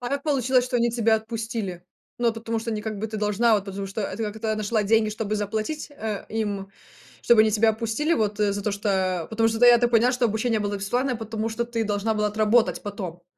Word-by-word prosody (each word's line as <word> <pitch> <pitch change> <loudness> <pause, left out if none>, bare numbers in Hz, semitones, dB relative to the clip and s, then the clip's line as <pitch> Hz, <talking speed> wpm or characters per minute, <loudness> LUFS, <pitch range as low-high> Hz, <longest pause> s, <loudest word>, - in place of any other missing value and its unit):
А 245 - -4
как 280 +1 -2
получилось, 260 -4 +2
что 250 0 -1
они 235 0 +2
тебя 230 -1 +2
отпустили? 220 -5 -5 0.3
Ну, 235 -1 +2
потому 225 0 -3
что 230 +1 -4
не 210 -1 -3
как 215 -1 -4
бы 220 - -2
ты 215 - -5
должна, 210 +2 +2
а - - +7
вот 200 -2 0
потому 195 0 -5
что, 195 +2 -4
э - - -1
это 195 +3 -4
как-то 220 +1 -2
нашла 215 +1 0
деньги, 220 +1 +3
чтобы 215 0 -3
заплатить, 215 +10 -3
э, 220 -8 -5
им, 205 -3 -3 0.5
чтобы 235 -2 +5
они 215 0 +4
тебя 220 +1 +3
отпустили, 230 +8 -1
вот, 210 -4 -1
э, 205 -1 +2
за 205 - -4
то, 210 - 0
что, 205 +1 -3 0.4
э, - - -10
потому 225 0 +2
что 225 0 -2
да, 245 - +6
я 240 -1 +8
так 240 0 +1
понимаю, 240 +2 +4
что 250 -1 +2
обучение 220 0 0
было 205 0 -2
бесплатное, 245 +6 -1
потому 225 0 -4
что 230 +1 -2
ты 230 -1 -2
должна 210 +1 -1
была 210 0 +1
отработать 215 +2 +2
потом. 185 -5 -6
220 Hz, 245 wpm, -24 LUFS, 210-235 Hz, 0.5 s, я